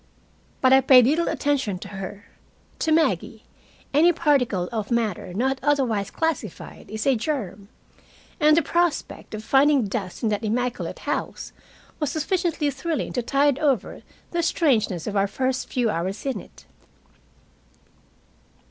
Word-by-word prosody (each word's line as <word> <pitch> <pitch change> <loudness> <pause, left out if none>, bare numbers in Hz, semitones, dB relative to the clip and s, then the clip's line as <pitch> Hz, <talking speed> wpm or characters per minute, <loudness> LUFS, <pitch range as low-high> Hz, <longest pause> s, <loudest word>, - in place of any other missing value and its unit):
But 260 0 +5
I 265 - +7
paid 255 -2 +7
little 315 +6 +2
attention 270 -10 0
to 195 +2 -9
her. 195 +1 -7 0.5
To 320 - 0
Maggie 320 0 +1 0.5
any 320 +5 +6
particle 265 - +1
of 220 -3 -3
matter 225 -7 -1
not 260 +8 0
otherwise 245 -9 +1
classified 305 - -4
is 220 +1 -4
a 270 - +4
germ, 215 - -4 0.7
and 305 0 +5
the 335 - +4
prospect 340 -8 -1
of 215 - -7
finding 275 0 +4
dust 195 -1 -5
in 225 - +2
that 210 0 -2
immaculate 245 +3 -2
house - - -3 0.5
was 300 -4 0
sufficiently 325 -2 0
thrilling 300 +3 -3
to 245 - 0
tide 280 +3 +2
over 275 -6 0 0.3
the 345 - 0
strangeness 225 - +1
of 210 - -4
our 200 0 +2
first 255 +5 -2
few 240 -4 +1
hours 190 +6 -3
in 265 -6 -1
it. - - -15
255 Hz, 140 wpm, -24 LUFS, 210-295 Hz, 0.7 s, I